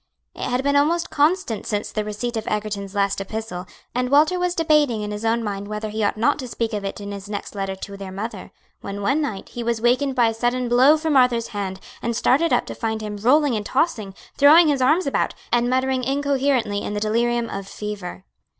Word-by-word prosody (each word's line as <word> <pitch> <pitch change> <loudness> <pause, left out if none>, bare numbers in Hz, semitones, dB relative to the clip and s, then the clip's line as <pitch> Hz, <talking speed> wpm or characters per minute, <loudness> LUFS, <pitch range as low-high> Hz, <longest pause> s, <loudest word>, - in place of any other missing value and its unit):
It - - -4
had 250 +2 0
been 280 0 +1
almost 330 +4 +2
constant 295 - +1
since 210 -1 -2
the 215 - -2
receipt 210 +3 -4
of 220 - -4
Egerton's 205 -2 -3
last 200 -1 +1
epistle, 195 -3 -5 0.3
and 250 +1 -1
Walter 305 +6 +4
was 355 0 0
debating 300 -9 +2
in 210 - -4
his 210 +1 -5
own 230 +1 +1
mind 200 -1 -4
whether 210 +1 -4
he 215 +1 -2
ought 205 - 0
not 265 +8 +2
to 255 - -5
speak 230 -1 -3
of 205 -1 -2
it 195 - -4
in 205 0 -6
his 200 0 -8
next 205 -1 -5
letter 195 -1 -3
to 200 +1 -8
their 195 -1 -7
mother, 210 +5 -6 0.3
when 200 0 -6
one 275 +9 +2
night 220 -10 -4
he 240 - -6
was 235 -1 0
wakened 255 +4 +2
by 240 -3 +4
a - - -3
sudden 245 +2 0
blow 255 +6 +5
from 310 -1 -1
Arthur's 250 -3 +3
hand, 195 -2 -4 0.2
and 235 0 -2
started 300 +8 +2
up 245 - +2
to - - -6
find 220 -1 -3
him 210 -1 -5
rolling 265 +4 +3
and 210 -1 -3
tossing, 230 - 0 0.2
throwing 310 +3 +7
his 280 -3 +1
arms 305 +8 +3
about, 275 - 0 0.2
and 240 +1 +2
muttering 260 0 +1
incoherently 270 -5 0
in 205 - -4
the - - -1
delirium 235 +2 +1
of 195 -2 -6
fever. 200 -3 -6
230 Hz, 225 wpm, -22 LUFS, 210-270 Hz, 0.3 s, throwing